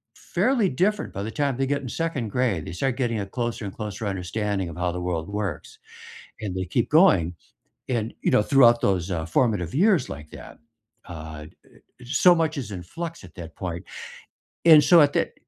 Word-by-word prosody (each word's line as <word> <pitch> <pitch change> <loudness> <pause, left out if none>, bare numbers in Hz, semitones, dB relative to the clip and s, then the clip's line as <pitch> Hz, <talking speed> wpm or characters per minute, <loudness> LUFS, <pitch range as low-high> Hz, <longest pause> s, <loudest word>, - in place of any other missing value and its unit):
fairly 215 +2 +1
different 200 +9 0
by 100 - -4
the 110 - -4
time 140 -2 -1
they 135 - 0
get 140 +1 -1
in 130 - -6
2nd 150 -6 -3
grade, 105 -9 0
they - - -6
start 130 +8 -1
getting 120 -4 -1
a 100 - -3
closer 120 -1 -4
and 95 - -7
closer 105 0 -5
understanding 95 0 -2
of 80 - -9
how 90 0 -1
the 90 +1 -5
world 85 -2 -3
works, 100 -5 -5 0.6
and 100 -4 -4
they 95 - -2
keep - - -1
going, 85 +1 +4 0.6
and, 115 -3 -1
you - - +1
know, - - +5
throughout 120 -3 +5
those, 95 -2 0
uh, 80 -2 -2
formative 90 -1 0
years 185 - +3
like 75 +2 -8
that, - - -11 0.5
uh, 80 -3 -8
d - - -20 0.4
so 175 +7 +5
much 160 -2 0
is 120 -6 -5
in 95 -3 -6
flux 165 - -7
at 90 - -14
that 80 -2 -10
point. 90 0 -5 0.8
And, 155 -3 +9
so, 170 +1 +7
at 145 -1 +4
that - - 0
105 Hz, 200 wpm, -24 LUFS, 90-140 Hz, 0.8 s, And